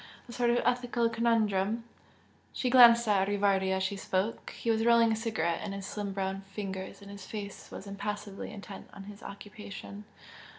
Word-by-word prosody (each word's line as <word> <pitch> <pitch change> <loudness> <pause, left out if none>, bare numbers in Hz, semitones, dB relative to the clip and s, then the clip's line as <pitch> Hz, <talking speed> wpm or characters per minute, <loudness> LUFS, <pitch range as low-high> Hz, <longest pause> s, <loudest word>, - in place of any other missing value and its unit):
A - - -9
sort 240 0 +1
of 240 0 +3
ethical 245 -1 +1
conundrum!" 225 -2 +1 0.7
She 250 - -1
glanced 235 -2 +8
at 195 -2 +3
Rivardi 200 -2 +2
as 190 0 +1
she 195 +2 -1
spoke 195 +3 -2
he 230 - -2
was 225 0 +1
rolling 230 -1 +5
a - - +2
cigarette 215 -7 -1
in 195 - -4
his 195 -1 -5
slim 205 0 -4
brown 195 0 -2
fingers 195 -1 -5
and 200 - -10
his 200 -2 -9
face 205 -2 -7
was - - -8
impassively 200 0 -5
intent 205 -2 -9
on 195 - -9
his 205 +1 -11
occupation. 205 0 -9
205 Hz, 175 wpm, -30 LUFS, 195-230 Hz, 0.7 s, glanced